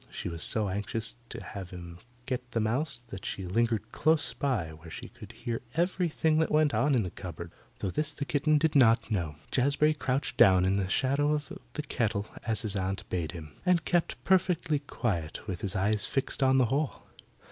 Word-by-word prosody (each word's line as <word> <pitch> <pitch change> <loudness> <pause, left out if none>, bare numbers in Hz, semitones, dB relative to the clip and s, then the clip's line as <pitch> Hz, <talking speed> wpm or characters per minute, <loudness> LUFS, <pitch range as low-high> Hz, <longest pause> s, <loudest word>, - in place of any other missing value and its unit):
She - - -4
was 85 -1 -6
so 110 -2 +2
anxious 105 +3 -3
to - - -7
have 95 -3 -7
him 85 -1 -9 0.3
get 125 -1 -4
the 115 - +1
mouse 120 +3 -1
that 95 -3 -7
she 95 - -4
lingered 115 +3 0
close 155 -1 +2
by 125 - -1
where 80 +1 -12
she - - -7
could - - -12
hear 115 -1 -4
everything 165 -2 +1
that 160 - +2
went 150 -1 +3
on 145 -1 +3
in 115 - +3
the 90 - -4
cupboard 85 -2 -7 0.3
though 95 - -2
this 150 +5 +2
the 145 -1 -4
kitten 150 +2 +2
did 155 0 +1
not 115 -4 +5
know. 85 -8 -1 0.2
Jazbury 145 +4 +3
crouched 130 -5 -2
down 95 -1 +6
in 95 +1 +2
the 95 -2 -1
shadow 140 +7 +2
of 150 +4 -3 0.2
the 150 - -3
kettle 110 -7 -1 0.2
as 110 -1 +1
his 105 -2 -1
aunt 95 0 -2
bade 85 -4 -2
him, 80 -4 -8
and 175 -3 +2
kept 175 -2 +1
perfectly 180 -5 +2
quiet 95 - -3
with 95 -3 -4
his 100 0 -1
eyes 100 +2 +1
fixed 135 0 -1
on 130 0 +5
the 130 - +5
hole. 145 0 -1
115 Hz, 200 wpm, -29 LUFS, 95-145 Hz, 0.3 s, down